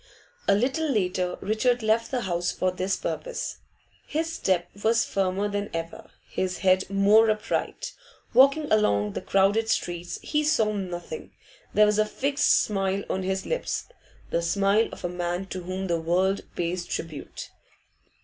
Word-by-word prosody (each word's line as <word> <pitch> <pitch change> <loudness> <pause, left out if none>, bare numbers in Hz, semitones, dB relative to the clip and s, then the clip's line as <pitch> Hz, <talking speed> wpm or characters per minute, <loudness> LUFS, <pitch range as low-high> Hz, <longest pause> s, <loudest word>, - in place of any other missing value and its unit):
A 200 - +5
little 270 +9 0
later 180 -6 0
Richard 235 +3 +1
left 220 +1 +2
the 255 -2 -1
house 175 -3 -1
for 185 - 0
this 185 +1 -1
purpose. - - -4 0.5
His 325 +2 -2
step 185 - 0 0.2
was 230 +1 +3
firmer 195 +1 0
than 205 0 -3
ever, 165 0 -6 0.2
his 185 -1 -2
head 185 0 +4
more 205 +3 +5
upright 215 - -2 0.4
Walking 275 +4 +6
along 105 - +2
the - - -4
crowded 200 +3 +2
streets, 175 -3 -2
he 300 0 0
saw 225 -8 +2
nothing; 190 - -5 0.4
there 210 - +7
was 210 0 +2
a 215 - +4
fixed 275 +5 0
smile 195 -1 -1
on 190 - -1
his 190 0 -2
lips, - - -2 0.4
the 170 - +1
smile 200 +5 +2
of - - -7
a - - +2
man 175 +1 -3
to 185 - -4
whom 185 +2 -4
the 170 -3 0
world 185 +4 +1
pays 175 +1 -1
tribute. 160 -5 -6
195 Hz, 155 wpm, -26 LUFS, 180-225 Hz, 0.5 s, there